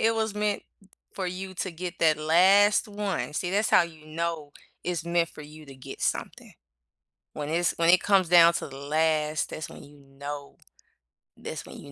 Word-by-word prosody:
it 225 0 +3
was 220 -2 -1
meant 210 -1 -1 0.5
for 190 - -4
you 185 +1 -6
to 185 - -3
get 175 +2 -7
that 155 -2 +4
last 190 +7 +4
one. 205 -6 -3
See, 180 - -2
that's 205 +3 +1
how - - +6
you 160 -2 -10
know 160 -2 -4 0.3
it's 175 -2 -3
meant 170 -1 +1
for 150 - -12
you 155 +1 -12
to 135 - -11
get 130 - -10
something. - - -3 0.8
When 145 -1 -5
it's 170 +2 +1
when 170 0 +3
it 180 - +6
comes 195 -4 +3
down 170 -1 +7
to - - -3
the 135 - -11
last 155 +1 0
that's 155 - -6
when - - -12
you 145 0 -17
know, 140 +1 -9 0.8
that's - - -7
when - - -11
you 140 - -12
170 Hz, 190 wpm, -27 LUFS, 155-185 Hz, 0.8 s, down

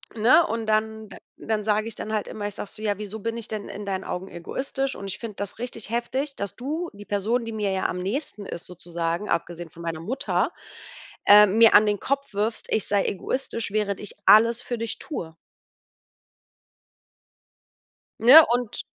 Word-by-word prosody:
Ne, 235 +9 +5
und 225 0 -3
dann 220 0 -1 0.3
dann 215 -1 -2
sage 215 +1 +1
ich 230 - -5
dann 215 - -5
halt 210 - -1
immer 205 -1 -4
ich 205 - -7
sage - - -6
so: 215 - -7
„Ja, 205 -2 0
wieso 210 +1 -6
bin 230 +2 -3
ich 230 - -6
denn 215 -2 -5
in 205 +1 -7
deinen 190 -1 -3
Augen 180 +2 -5
egoistisch? 270 +10 -3
Und 200 - -8
ich 195 - -6
finde 225 -3 -7
das 200 +2 -6
richtig 230 -3 -5
heftig, 260 +4 -2
dass 200 -1 -4
du, 310 +7 -4
die 205 0 -12
Person, 215 +4 0
die 230 - -5
mir 210 -2 -1
ja 190 - -1
am 180 - -4
nächsten 205 +1 -4
ist 170 - -6
sozusagen 175 +1 -4
abgesehen 170 0 -2
von 170 +2 -12
meiner 165 -1 -3
Mutter, 255 +10 -1 0.7
äh, 210 +1 +9
mir 220 +3 +5
an 215 - +8
den 205 -1 0
Kopf 275 -3 -2
wirfst, 215 +3 -2
ich 220 - 0
sei 200 -1 +1
egoistisch, 230 +2 -2
während 205 -2 -1
ich 205 - -5
alles 230 +2 +6
für 240 - -3
dich 230 -1 -3
tue.“ 165 - -6 2.8
Ne, 275 +8 +10
und 245 -2 -2
215 Hz, 185 wpm, -25 LUFS, 200-230 Hz, 2.8 s, Ne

